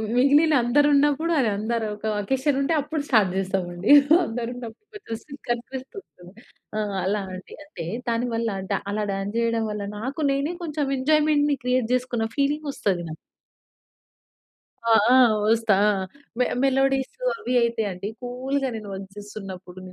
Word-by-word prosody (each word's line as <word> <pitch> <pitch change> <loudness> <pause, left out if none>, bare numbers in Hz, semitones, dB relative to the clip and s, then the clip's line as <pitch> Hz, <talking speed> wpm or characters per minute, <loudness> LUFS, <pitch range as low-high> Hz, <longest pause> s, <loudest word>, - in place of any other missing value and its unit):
మిగిలిన 290 +5 +5
అందరు 285 +5 +3
ఉన్నప్పుడు 295 +4 +2 0.2
అందరు 225 +2 -1
ఒక 210 - -10 0.2
అకేషన్ 265 +5 0
ఉంటే 275 +4 +1
అప్పుడు 300 +1 -3
స్టార్ట్ 210 -7 +4
జేస్తాం 190 -1 -1
అండి. 175 +7 0 0.3
అందరున్నప్పుడు 240 - -6
కొంచం 230 - -6
సిగ్గనిపిస్తది 265 +5 -6 0.2
గదా! 180 +1 -14 0.4
ఆ! - - +1 0.2
అలా 200 +2 0
అండి. 185 0 -10
అంటే 175 - -8 0.2
దాని 235 +1 0
వల్ల 230 0 0
అంటే 190 - -1
అలా 210 +1 -1
డాన్స్ 195 +2 -4
చేయడం 230 -1 +1
వల్ల 210 -1 -4
నాకు 260 +8 -5
నేనే 280 +5 -1
కొంచెం 300 -4 -2
ఎంజాయ్‌మెంట్‌ని 295 +1 +3
క్రియేట్ 250 -2 +1
చేసుకున్న 245 -3 -1
ఫీలింగ్ 290 +2 0
వస్తది 190 -8 -1
నాకు. 155 - -6 1.7
ఆ! - - +5 0.2
ఆ! - - +7 0.3
వస్తా 225 -2 +3
ఆ! - - +5 0.5
మె 250 - +4 0.2
మెలోడీస్ 270 0 +2 0.3
అవి 350 - -3
అయితే 235 -1 0
అండి 185 +2 -6
కూల్‌గా 265 +2 -2
నేను 215 -2 -7
వర్క్ 195 0 -8
జేస్తున్నప్పుడు, 195 -3 -9
245 Hz, 145 wpm, -24 LUFS, 210-280 Hz, 1.7 s, ఆ